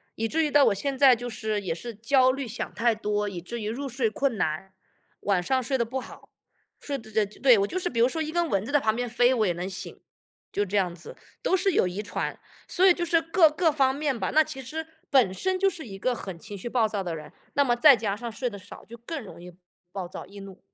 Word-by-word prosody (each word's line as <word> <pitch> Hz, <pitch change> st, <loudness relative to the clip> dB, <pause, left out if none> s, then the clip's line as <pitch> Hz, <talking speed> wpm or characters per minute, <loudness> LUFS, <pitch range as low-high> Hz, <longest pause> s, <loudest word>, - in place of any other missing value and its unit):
以 225 Hz, -, -1 dB
至 320 Hz, +7 st, +1 dB
于 300 Hz, -, 0 dB
到 290 Hz, -1 st, +6 dB
我 -, -, +4 dB
现 275 Hz, +7 st, -2 dB
在 260 Hz, -2 st, +7 dB
就 245 Hz, +1 st, -6 dB
是 215 Hz, -1 st, -2 dB
也 180 Hz, -4 st, -2 dB
是 230 Hz, +6 st, -7 dB
焦 255 Hz, +4 st, +3 dB
虑 270 Hz, 0 st, -4 dB
想 220 Hz, -5 st, -4 dB
太 230 Hz, +4 st, +2 dB
多， 210 Hz, -1 st, -1 dB
以 180 Hz, -3 st, -6 dB
至 235 Hz, +7 st, -6 dB
于 210 Hz, -, -3 dB
入 275 Hz, +5 st, -4 dB
睡 245 Hz, -3 st, 0 dB
困 265 Hz, +1 st, -1 dB
难。 160 Hz, +5 st, -2 dB, 0.5 s
晚 195 Hz, -3 st, +1 dB
上 260 Hz, +8 st, 0 dB
睡 265 Hz, +3 st, 0 dB
得 235 Hz, -, 0 dB
不 260 Hz, +3 st, -4 dB
好， -, -, -13 dB, 0.5 s
睡 285 Hz, -1 st, -3 dB
得 220 Hz, -4 st, -12 dB
得 215 Hz, -1 st, +1 dB
对， 255 Hz, -5 st, +6 dB
我 200 Hz, -, +2 dB
就 370 Hz, -, -3 dB
是 355 Hz, -, -2 dB
比 230 Hz, -2 st, 0 dB
如 245 Hz, -, +5 dB
说 320 Hz, +2 st, -3 dB
一 310 Hz, 0 st, -3 dB
根 345 Hz, -1 st, +1 dB
蚊 200 Hz, -2 st, 0 dB
子 285 Hz, -, -5 dB
在 290 Hz, -1 st, +3 dB
旁 220 Hz, 0 st, +2 dB
边 245 Hz, -1 st, -2 dB
飞， 245 Hz, +2 st, +3 dB
我 220 Hz, -5 st, +2 dB
也 175 Hz, -, +1 dB
能 175 Hz, +2 st, -4 dB
醒， 190 Hz, -1 st, -6 dB, 0.5 s
就 205 Hz, -, 0 dB
这 200 Hz, -, -5 dB
样 185 Hz, -4 st, +1 dB
子， 170 Hz, -, -10 dB, 0.3 s
都 -, -, +2 dB
是 385 Hz, +1 st, +2 dB
有 185 Hz, -, +2 dB
遗 185 Hz, +4 st, -4 dB
传。 -, -, -4 dB, 0.3 s
所 370 Hz, -, +2 dB
以 370 Hz, -, +8 dB
就 345 Hz, -, -2 dB
是 330 Hz, 0 st, +3 dB
各 330 Hz, 0 st, +5 dB
各 320 Hz, +1 st, +2 dB
方 270 Hz, -2 st, +2 dB
面 285 Hz, -4 st, -1 dB
吧。 -, -, -1 dB
那 315 Hz, +1 st, +5 dB
其 265 Hz, -, -6 dB
实 315 Hz, +5 st, -5 dB, 0.2 s
本 250 Hz, -10 st, +4 dB
身 375 Hz, -, -1 dB
就 390 Hz, +1 st, +3 dB
是 330 Hz, -8 st, -8 dB
一 195 Hz, -, -8 dB
个 250 Hz, +6 st, 0 dB
很 190 Hz, -7 st, -6 dB
情 205 Hz, +1 st, -8 dB
绪 190 Hz, -, -7 dB
暴 235 Hz, -2 st, +2 dB
躁 210 Hz, -2 st, -2 dB
的 175 Hz, -3 st, -4 dB
人， 155 Hz, -, -10 dB, 0.2 s
那 285 Hz, -, +4 dB
么 240 Hz, -3 st, +1 dB
再 280 Hz, +1 st, +8 dB
加 210 Hz, -3 st, -2 dB
上 235 Hz, +2 st, -6 dB
睡 245 Hz, +3 st, -3 dB
得 205 Hz, -3 st, -9 dB
少， -, -, -12 dB
就 235 Hz, -, -12 dB
更 265 Hz, +3 st, -6 dB
容 185 Hz, -, -12 dB
易 180 Hz, 0 st, -11 dB, 0.4 s
暴 190 Hz, -2 st, -4 dB
躁、 175 Hz, -, -8 dB
易 200 Hz, 0 st, -12 dB
怒。 195 Hz, -1 st, -11 dB
235 Hz, 290 characters per minute, -26 LUFS, 205-280 Hz, 0.5 s, 以